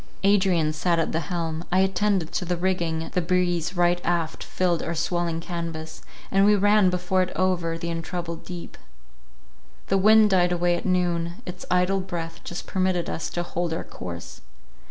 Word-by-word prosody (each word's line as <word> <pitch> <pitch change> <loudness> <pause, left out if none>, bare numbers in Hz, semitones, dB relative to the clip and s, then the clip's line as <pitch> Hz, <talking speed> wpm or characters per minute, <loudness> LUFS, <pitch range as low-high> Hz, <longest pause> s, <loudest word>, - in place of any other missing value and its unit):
Adrian 190 -6 +3
sat 170 +2 +1
at 165 - 0
the 160 - 0
helm; 165 0 -3
I 185 +1 +4
attended 190 -2 +1
to - - -2
the 180 0 -1
rigging, 170 -3 -1
the 180 - +2
breeze 175 0 0
right 175 0 +3
aft 170 -2 -1
filled 175 -2 0
our 170 - -3
swelling 170 0 -1
canvas, 165 -2 -5 0.3
and 195 0 +4
we 210 +1 +6
ran 205 -1 +4
before 180 +1 +1
it 185 - -1
over 175 -3 0
the 170 0 -4
untroubled 170 0 -5
deep. 175 -2 -8 1.1
The 195 - +3
wind 215 +1 +6
died 180 -2 +4
away 175 0 +2
at 175 - -4
noon; 175 +2 0
its 180 0 -7
idle 180 +2 +2
breath 165 -3 -5
just 175 - -6
permitted 185 -2 0
us 160 - -3
to 175 - -2
hold 175 -1 -2
our - - -3
course. 85 -1 -8
175 Hz, 175 wpm, -25 LUFS, 165-185 Hz, 1.1 s, we